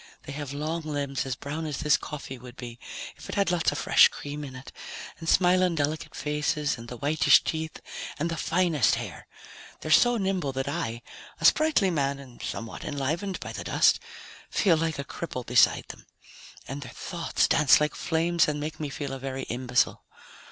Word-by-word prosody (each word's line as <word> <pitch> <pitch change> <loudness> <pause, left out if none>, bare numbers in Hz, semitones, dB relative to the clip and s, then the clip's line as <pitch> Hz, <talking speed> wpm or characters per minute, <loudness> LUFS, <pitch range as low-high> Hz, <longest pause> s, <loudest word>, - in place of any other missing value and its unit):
They - - -8
have 140 -1 -5
long 155 +4 -2
limbs 140 -3 -2
as 130 - -2
brown 155 +4 -4
as 145 -3 -3
this 150 -1 +4
coffee 140 -3 -6
would 125 0 -11
be 120 -1 -8 0.4
if - - -11
it - - -4
had 200 -3 +2
lots 170 -3 +2
of - - -4
fresh - - +6
cream 145 +1 -7
in 135 -3 -8
it, 130 +1 -10 0.5
and 165 -1 -4
smiling 180 -1 +4
delicate 155 +1 -2
faces 150 0 0
and 115 -1 -10
the 125 - -7
whitish 150 +5 +5
teeth 160 0 -3 0.4
and 155 +3 0
the - - -1
finest 160 -7 +2
hair. - - -7 0.5
They're 155 - -4
so 240 +8 +6
nimble 190 -8 -1
that 135 +1 -2
I 120 -4 -3 0.4
a - - -2
sprightly 305 -12 +4
man 140 -3 0
and 130 -3 -13
somewhat 115 0 -5
enlivened 155 +7 -2
by - - -6
the - - -5
dust - - +4 0.5
feel 185 -6 +3
like 160 -1 -1
a 140 - -3
cripple 130 -7 -5
beside 125 0 +4
them. - - -11 0.6
And 140 +2 -5
their - - -9
thoughts 170 -3 -1
dance 150 - +6
like 150 0 +1
flames 170 +1 +1
and 150 -1 -1
make 150 +1 -5
me 150 -2 -3
feel 140 0 -4
a 135 - -5
very 135 0 -4
imbecile. 125 0 +1
150 Hz, 190 wpm, -27 LUFS, 135-165 Hz, 0.6 s, fresh